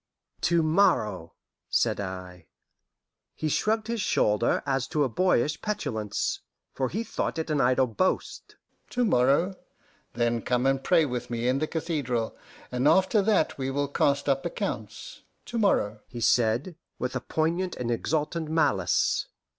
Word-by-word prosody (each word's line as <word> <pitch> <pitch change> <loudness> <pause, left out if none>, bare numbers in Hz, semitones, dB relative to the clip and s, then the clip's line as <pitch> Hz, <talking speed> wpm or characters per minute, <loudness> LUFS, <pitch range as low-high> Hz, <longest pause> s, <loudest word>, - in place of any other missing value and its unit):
"To 170 -1 +3
morrow," 110 - +1 0.3
said - - +1
I. 90 -3 -7 0.9
He 155 - -2
shrugged 215 +7 +1
his 230 -1 -2
shoulder 105 - +2
as 135 -1 0
to 150 +1 +1
a 135 - 0
boyish 150 -1 +1
petulance, 110 - -2 0.3
for 130 -2 -1
he 215 - -2
thought 225 - -3
it 160 0 -2
an 145 -2 +2
idle 130 +1 +3
boast. 125 - -2 0.3
"To 245 0 0
morrow? 140 - +3 0.6
Then 120 0 0
come 125 +2 0
and 135 0 +1
pray 165 -1 +4
with 125 -3 -4
me 120 0 -2
in 130 +2 +2
the 155 - -1
cathedral, 145 -9 -2 0.4
and 125 +2 +1
after 190 +5 +4
that 200 -8 +1
we 130 0 -1
will 145 +1 -1
cast 140 0 +1
up 135 -1 +1
accounts - - -5 0.2
to 235 - -3
morrow," 110 - +2
he 120 - -8
said, 120 +9 +2 0.2
with 125 - -3
a 130 - -1
poignant 170 +6 -1
and 120 -1 -3
exultant 150 +6 -1
malice. 105 - +1
140 Hz, 150 wpm, -27 LUFS, 120-170 Hz, 0.9 s, pray